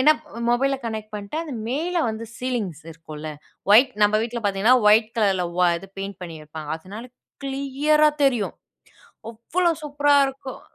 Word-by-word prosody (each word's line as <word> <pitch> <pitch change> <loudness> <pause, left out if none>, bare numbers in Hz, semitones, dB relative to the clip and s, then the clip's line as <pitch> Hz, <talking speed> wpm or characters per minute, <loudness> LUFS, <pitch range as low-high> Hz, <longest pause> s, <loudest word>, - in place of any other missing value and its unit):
என்ன 300 +4 +7 0.4
மொபைல 270 +3 +2
கனெக்ட் 215 -1 -5
பண்ணிட்டா, 205 +10 -4
அது 295 - -7 0.2
மேலே 340 +6 -1
வந்து 225 +1 -6
சீலிங்ஸ் 220 - -3
இருக்கும்ல, 155 -1 -8 0.4
ஒயிட் 250 +4 +7
நம்ம 210 +1 +4
வீட்ல 235 0 -4
பாத்தீங்கன்னா, 200 +6 +4
ஒயிட் 220 +1 +5
கலர்ல 195 -4 +2 0.2
ஓ - - +5 0.2
இது 195 - -13
பெயிண்ட் 195 -1 -5
பண்ணிருப்பாங்க. 155 -2 -8
அதனால 205 +8 -9 0.4
கிளியரா 280 +3 +2 0.2
தெரியும். 245 -7 +1 0.7
அவ்ளோ 335 +11 0
சூப்பரா 290 0 +2
இருக்கும்! 265 -1 -7
230 Hz, 140 wpm, -23 LUFS, 195-275 Hz, 0.7 s, என்ன